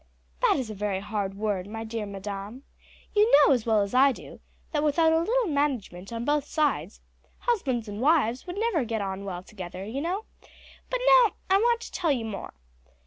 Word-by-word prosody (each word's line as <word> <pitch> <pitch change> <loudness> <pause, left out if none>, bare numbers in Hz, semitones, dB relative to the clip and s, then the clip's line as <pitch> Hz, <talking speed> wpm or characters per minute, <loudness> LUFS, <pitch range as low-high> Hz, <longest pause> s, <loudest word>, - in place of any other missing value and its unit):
"That - - +4
is 250 -5 -3
a - - -5
very 200 -1 -2
hard 200 -1 -3
word, 200 -3 -2
my 225 +2 -6
dear 220 -1 -4
madam. 200 +5 -6 0.5
You 425 +2 +4
know - - +5
as 240 -3 -1
well 220 -2 +4
as 200 +2 -3
I 270 +2 +6
do - - -10 0.3
that 300 -3 0
without 320 +2 +3
a 325 - +4
little 470 +8 +1
management 260 - -2
on 230 0 -4
both 295 0 +1
sides 275 - -1 0.4
husbands 265 - 0
and 205 +2 -6
wives 275 -2 +2
would 355 +2 -5
never 430 - +1
get 225 -2 -2
on 195 0 -4
well 180 -2 -5
together; 185 -1 -8
but 285 +6 -2 1.0
now - - +7 0.2
I 385 - +7
want 470 +2 +2
to - - -8
tell 335 -4 0
you 245 -5 -1
more. 200 -4 -6
240 Hz, 190 wpm, -27 LUFS, 205-320 Hz, 1.0 s, now